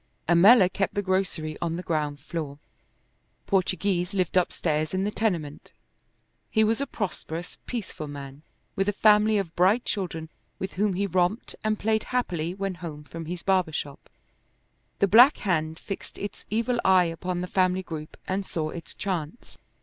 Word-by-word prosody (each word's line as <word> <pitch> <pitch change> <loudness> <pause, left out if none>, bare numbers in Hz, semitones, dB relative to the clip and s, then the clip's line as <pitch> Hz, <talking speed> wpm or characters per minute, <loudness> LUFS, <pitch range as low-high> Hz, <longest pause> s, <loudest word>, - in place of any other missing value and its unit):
Ammella 185 +5 +7
kept 195 +1 -2
the 205 - 0
grocery 185 -5 -1
on 165 -1 -1
the 180 - -5
ground 150 -3 -1
floor. 145 -1 -5 0.9
Portoghese 185 -1 0
lived 185 -3 0
upstairs 155 -2 +1
in 190 - +1
the 205 - 0
tenement. 170 -10 -2 0.8
He 220 - +3
was 225 +4 +2
a 280 - -1
prosperous, 175 -4 -5
peaceful 190 -9 -5
man, 140 -1 -8 0.3
with 195 +1 +1
a - - 0
family 210 +1 +5
of 175 -5 -3
bright 195 +7 +3
children, 165 -5 -3 0.3
with 190 - -4
whom 200 +1 +1
he 200 +2 0
romped 185 +4 0
and 215 0 +1
played 220 +1 0
happily 180 -9 -1
when 195 -1 -2
home 165 -4 -8
from 165 +2 -8
his 175 +1 -5
barber 185 -4 +2
shop. 145 -1 -5 0.9
The 200 - +3
Black 245 +8 +8
Hand 160 -4 -1
fixed 195 - -7
its 205 - -6
evil 235 +3 0
eye 185 -1 +5
upon 175 +2 -3
the - - -2
family 185 0 +1
group 155 -3 -7
and 190 +2 -1
saw 155 -4 -3
its 170 -1 -8
chance. 180 0 -5
185 Hz, 165 wpm, -26 LUFS, 160-200 Hz, 0.9 s, Black